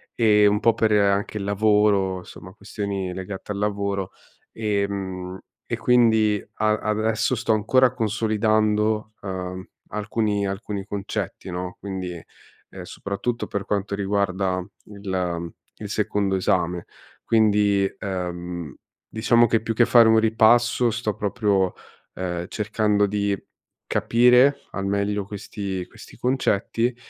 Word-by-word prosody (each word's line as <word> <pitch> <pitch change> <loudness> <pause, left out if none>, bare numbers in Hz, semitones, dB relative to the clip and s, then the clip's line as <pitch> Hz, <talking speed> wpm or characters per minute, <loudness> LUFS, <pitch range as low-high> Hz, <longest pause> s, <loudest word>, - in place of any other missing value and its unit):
ehm, 105 -3 +5
un 105 0 +1
po' 115 - +4
per 110 -1 +1
anche 100 0 +2
il 100 - -3
lavoro, 100 -2 +2
insomma, 95 +1 -12
questioni 100 -2 -4
legate 95 +2 -6
al 100 - -3
lavoro 100 -2 -2 0.4
e 105 -2 0
mhmm, 95 -2 -5 0.3
e - - -2
quindi 110 -3 +3
a 110 0 +1
adesso 110 +3 0
sto 115 0 -1
ancora 125 +4 +3
consolidando, 110 -1 +1
uhm, 95 -1 -5 0.3
alcuni 105 -1 -1
alcuni 100 0 -4
concetti, 100 -2 -5
no, 90 +1 -5
quindi, 95 -2 -5 0.6
ehm, - - -9
soprattutto 115 +4 -4
per 100 -1 -4
quanto 100 -1 -2
riguarda 95 -2 0 0.2
il 90 -5 -4 0.2
il - - -7
secondo 100 -2 0
esame. 90 -2 0 0.4
Quindi, 105 -3 +3
ehm, 90 -5 -5 0.3
diciamo 120 +2 +3
che 115 0 +1
più 115 +1 -2
che 120 - +5
fare 115 -1 +6
un 110 - +5
ripasso 115 +2 +4
sto 115 -2 -2
proprio, 100 -3 0 0.4
ehm, 90 -1 -3
cercando 105 -1 +1
di 100 0 0 0.5
capire 125 +4 +4
al 100 - -4
meglio 100 0 -1
questi 100 -2 -5
questi - - -14
concetti 120 -1 0
105 Hz, 125 wpm, -23 LUFS, 95-110 Hz, 0.6 s, fare